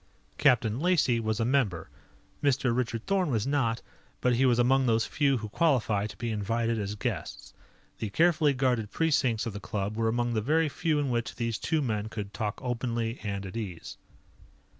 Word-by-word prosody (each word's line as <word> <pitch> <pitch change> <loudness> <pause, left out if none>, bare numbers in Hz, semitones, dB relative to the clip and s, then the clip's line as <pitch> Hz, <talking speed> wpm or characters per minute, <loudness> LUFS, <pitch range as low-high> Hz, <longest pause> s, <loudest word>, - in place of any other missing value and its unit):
Captain 110 -1 +3
Lacey 155 -8 +2
was 110 0 -1
a 115 - +1
member. 115 - +1 0.5
Mr. 130 -4 +2
Richard 120 -2 -2
Thorn 190 -4 +1
was 110 -5 0
not, 125 -5 0 0.4
but 125 - +2
he 130 +2 +3
was 120 -2 +3
among 130 +2 +3
those 115 -1 +2
few 140 -3 +1
who 110 -2 -5
qualify 110 -8 +1
to - - -11
be 120 -1 -3
invited 115 +2 -1
as 105 0 -3
guests. 105 -8 -5 0.5
The 110 - -3
carefully 160 - +3
guarded 125 -5 0
precincts 135 -8 +1
of 115 - -4
the 105 - -5
club 105 0 -3
were 115 0 0
among 120 +1 0
the 110 - 0
very 155 +6 +2
few 155 +1 0
in 145 -3 0
which 120 -1 -2
these 115 -3 -2
two 155 -2 0
men 110 -3 -2
could 105 -2 -6
talk 110 -1 -3
openly 120 -1 -2
and 100 -2 -4
at 95 - -8
ease. 95 -7 -6
115 Hz, 185 wpm, -28 LUFS, 110-135 Hz, 0.5 s, Captain